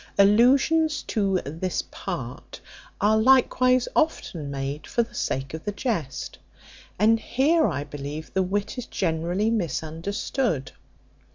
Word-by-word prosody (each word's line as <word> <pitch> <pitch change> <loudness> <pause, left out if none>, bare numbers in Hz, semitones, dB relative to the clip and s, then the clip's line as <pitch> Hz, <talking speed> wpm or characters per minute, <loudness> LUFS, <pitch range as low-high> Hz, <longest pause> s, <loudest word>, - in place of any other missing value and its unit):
Allusions 265 +10 +4
to 195 -3 0
this 165 +6 -2
part - - -6 0.4
are 215 +1 +3
likewise 255 +1 +4
often 175 - 0
made 140 +2 -4
for 235 - +1
the 225 - -14
sake 135 +1 -3
of 160 - -6
the 205 - -2
jest. 205 - -3 0.6
And 225 +3 +4
here, 300 +8 +2
I 140 - -2
believe, 145 +1 -7
the 190 - +2
wit 200 +5 -2
is 245 - -6
generally 175 +5 0
misunderstood. 170 - -2
200 Hz, 120 wpm, -25 LUFS, 160-240 Hz, 0.6 s, Allusions